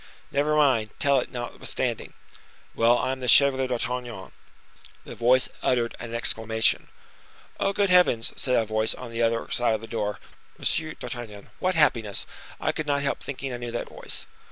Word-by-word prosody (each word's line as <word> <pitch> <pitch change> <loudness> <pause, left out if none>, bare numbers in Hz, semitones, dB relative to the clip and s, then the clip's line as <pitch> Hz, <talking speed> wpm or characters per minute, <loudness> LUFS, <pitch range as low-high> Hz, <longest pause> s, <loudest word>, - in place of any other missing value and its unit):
"Never 145 +2 +1
mind, 130 -8 +3
tell 140 -1 +3
it, - - -5
notwithstanding." 120 -1 -4 0.6
"Well, 120 +1 +4
I 130 - 0
am 130 - -4
the 125 - -4
Chevalier 135 +1 +5
d'Artagnan." 125 -4 -4 0.7
The - - -8
voice 125 +2 +3
uttered 120 -2 +1
an 115 0 -6
exclamation. 110 -1 +1 0.7
"Oh! 195 - +2
good 200 -1 +1
heavens!" 180 -11 +4
said 125 -2 +1
a 115 - +3
voice 110 +1 0
on 125 -2 -9
the 115 0 -2
other 115 0 +1
side 120 -2 +2
of 110 - -5
the - - -6
door. 105 -3 -3 0.4
"Monsieur 155 -1 0
d'Artagnan. 115 -5 -8
What 185 0 +1
happiness! 115 -10 +2 0.3
I - - +1
could 155 - -4
not 140 -1 +1
help 140 - -1
thinking 135 -1 -5
I - - -3
knew 120 0 -5
that 120 - -3
voice." - - -5
120 Hz, 175 wpm, -26 LUFS, 115-140 Hz, 0.7 s, Chevalier